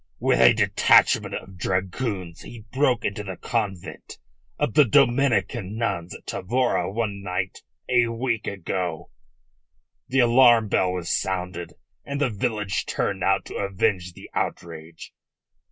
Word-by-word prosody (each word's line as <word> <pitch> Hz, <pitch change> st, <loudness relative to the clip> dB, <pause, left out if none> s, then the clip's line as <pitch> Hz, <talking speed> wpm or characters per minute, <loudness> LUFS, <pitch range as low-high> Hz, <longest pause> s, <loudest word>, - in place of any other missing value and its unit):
"With -, -, +1 dB
a 65 Hz, -1 st, +8 dB
detachment -, -, +3 dB
of 95 Hz, -2 st, -9 dB
dragoons 95 Hz, -2 st, -3 dB
he 115 Hz, -3 st, -11 dB
broke 130 Hz, -3 st, +1 dB
into 100 Hz, +1 st, -2 dB
the 95 Hz, -2 st, -7 dB
convent 105 Hz, -7 st, -4 dB, 0.4 s
of 110 Hz, -, -1 dB
the 150 Hz, -, +7 dB
Dominican 120 Hz, -5 st, +2 dB
nuns 95 Hz, -7 st, -2 dB
at -, -, -13 dB
Tavora 120 Hz, -3 st, -1 dB
one 100 Hz, -2 st, -3 dB
night 95 Hz, 0 st, -3 dB, 0.3 s
a 120 Hz, -2 st, +3 dB
week 115 Hz, -1 st, -2 dB
ago. 90 Hz, -3 st, -4 dB, 1.0 s
The 135 Hz, 0 st, -2 dB
alarm 120 Hz, -2 st, +5 dB
bell 90 Hz, -2 st, +1 dB
was 90 Hz, -2 st, -3 dB
sounded, 90 Hz, -2 st, -3 dB, 0.3 s
and 140 Hz, 0 st, -4 dB
the 140 Hz, -5 st, +1 dB
village 105 Hz, -3 st, -2 dB
turned -, -, -2 dB
out -, -, +2 dB
to -, -, -7 dB
avenge 100 Hz, -2 st, -1 dB
the -, -, -12 dB
outrage. 80 Hz, -1 st, -5 dB
100 Hz, 135 wpm, -24 LUFS, 90-120 Hz, 1.0 s, a